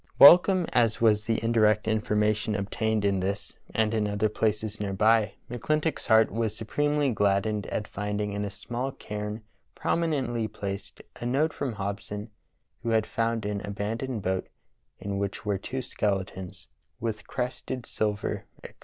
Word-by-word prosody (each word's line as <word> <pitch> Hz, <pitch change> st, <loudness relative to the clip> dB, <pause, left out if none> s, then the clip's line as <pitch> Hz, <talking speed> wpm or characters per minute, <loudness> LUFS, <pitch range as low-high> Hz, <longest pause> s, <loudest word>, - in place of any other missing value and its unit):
Welcome 180 Hz, +4 st, +9 dB
as 115 Hz, -3 st, +3 dB
was 105 Hz, -2 st, +4 dB
the 115 Hz, -1 st, +1 dB
indirect 110 Hz, -2 st, +3 dB
information 105 Hz, 0 st, +1 dB
obtained 105 Hz, +1 st, 0 dB
in 100 Hz, -1 st, +2 dB
this 100 Hz, +2 st, -3 dB
and 110 Hz, 0 st, +1 dB
in 110 Hz, -2 st, +1 dB
other 105 Hz, +1 st, +1 dB
places 110 Hz, 0 st, -1 dB
near 100 Hz, -2 st, -2 dB
by, 110 Hz, +1 st, +3 dB, 0.2 s
iMcCIintock's 155 Hz, +5 st, -1 dB
heart 110 Hz, 0 st, +5 dB
was 110 Hz, -1 st, -1 dB
supremely 145 Hz, +5 st, +1 dB
gladdened 105 Hz, -1 st, +1 dB
at 105 Hz, -, -3 dB
finding 105 Hz, 0 st, -2 dB
in 100 Hz, 0 st, -2 dB
a 100 Hz, -, -2 dB
small 120 Hz, +6 st, -4 dB
cairn, 105 Hz, +1 st, -5 dB, 0.3 s
prom 170 Hz, -, 0 dB
inently 130 Hz, -9 st, -1 dB
placed;, 100 Hz, 0 st, -6 dB
a 120 Hz, -, -4 dB
note 150 Hz, +5 st, +2 dB
from 135 Hz, -4 st, -3 dB
Hobson 100 Hz, +1 st, -5 dB, 0.5 s
who -, -, -2 dB
had 110 Hz, -1 st, +3 dB
found 115 Hz, -2 st, -1 dB
an 105 Hz, -1 st, -2 dB
abandoned 105 Hz, +3 st, -3 dB
boat, 95 Hz, 0 st, -1 dB, 0.5 s
in 100 Hz, 0 st, -3 dB
which 100 Hz, +2 st, -3 dB
were 100 Hz, -2 st, 0 dB
two 130 Hz, +6 st, -4 dB
skeletons, 95 Hz, -4 st, -3 dB, 0.3 s
with 110 Hz, -2 st, -3 dB
crested 125 Hz, -1 st, -3 dB
silver, 105 Hz, -1 st, -2 dB, 0.2 s
etc. -, -, -9 dB
110 Hz, 155 wpm, -28 LUFS, 105-115 Hz, 0.5 s, Welcome